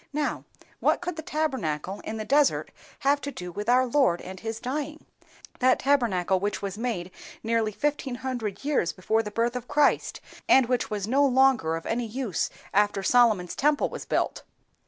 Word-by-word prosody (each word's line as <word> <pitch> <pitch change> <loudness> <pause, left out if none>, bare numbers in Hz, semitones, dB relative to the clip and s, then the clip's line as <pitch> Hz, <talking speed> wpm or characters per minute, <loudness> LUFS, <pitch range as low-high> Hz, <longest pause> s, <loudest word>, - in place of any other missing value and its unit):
Now, 295 0 -2 0.3
what - - +2
could 355 -1 -4
the 315 - -5
Tabernacle 205 - -2
in 220 - -5
the 215 - -4
desert 285 +2 +2 0.3
have 285 +1 +2
do 185 -11 -6
with 205 +5 -4
our 255 +1 +5
Lord 250 -9 +2
and 190 0 -9
His 225 +1 -5
dying,—that 270 -1 -3
Tabernacle 205 -10 +2
which 205 +2 -2
was 200 -1 -4
made 210 -6 -3 0.3
nearly 225 -1 +1
fifteen 290 +1 -2
hundred 245 -4 -4
years 280 - +1
before 220 +4 0
the 210 - -6
birth 235 +3 0
of 250 -1 -5
Christ, 290 0 +2 0.3
and 265 -1 +6
which 250 0 -1
was 205 -1 -3
no 270 +5 +3
longer 260 - +3
of 165 - -6
any 235 +1 -1
use 230 -3 -2 0.2
after 205 -1 +2
Solomon's 215 -6 +3
temple 295 +1 +2
was - - -7
built?" - - -1
240 Hz, 170 wpm, -26 LUFS, 205-275 Hz, 0.3 s, and